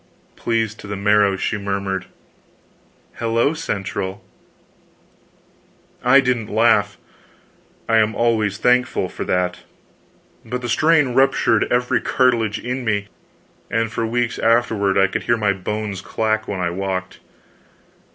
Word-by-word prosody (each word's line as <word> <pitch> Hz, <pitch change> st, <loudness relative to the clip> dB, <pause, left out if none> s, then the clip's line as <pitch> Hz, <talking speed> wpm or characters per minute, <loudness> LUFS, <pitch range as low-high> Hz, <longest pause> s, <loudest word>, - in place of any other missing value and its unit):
Pleased 115 Hz, -1 st, -2 dB
to -, -, -10 dB
the 100 Hz, -, -4 dB
marrow, 100 Hz, 0 st, +3 dB
she 105 Hz, +3 st, -2 dB
murmured: 100 Hz, -2 st, -3 dB, 1.1 s
"HELLO 115 Hz, +5 st, +1 dB
CENTRAL!" 100 Hz, -8 st, -4 dB, 1.8 s
I 125 Hz, +3 st, +6 dB
didn't 125 Hz, -5 st, 0 dB
laugh 105 Hz, -3 st, +2 dB, 0.9 s
I 115 Hz, -, +3 dB
am 110 Hz, 0 st, +2 dB
always 110 Hz, -4 st, +1 dB
thankful 125 Hz, +3 st, +1 dB
for -, -, -6 dB
that 90 Hz, 0 st, -1 dB, 0.8 s
but 125 Hz, +2 st, -5 dB
the 120 Hz, -, -3 dB
strain 155 Hz, +2 st, +3 dB
ruptured 120 Hz, -3 st, +2 dB
every 125 Hz, -1 st, +1 dB
cartilage 115 Hz, -5 st, +1 dB
in 125 Hz, +1 st, -4 dB
me, 105 Hz, -3 st, -1 dB, 0.6 s
and 115 Hz, -1 st, -1 dB
for 115 Hz, -, -2 dB
weeks 120 Hz, 0 st, -1 dB
afterward 110 Hz, -4 st, +2 dB
I 95 Hz, -, +5 dB
could 95 Hz, -, -3 dB
hear 120 Hz, -, +2 dB
my 105 Hz, -3 st, +1 dB
bones 100 Hz, +1 st, -4 dB
clack 110 Hz, +1 st, -1 dB
when 100 Hz, -, -4 dB
I 90 Hz, -1 st, -1 dB
walked. 95 Hz, 0 st, -4 dB
110 Hz, 125 wpm, -20 LUFS, 100-120 Hz, 1.8 s, I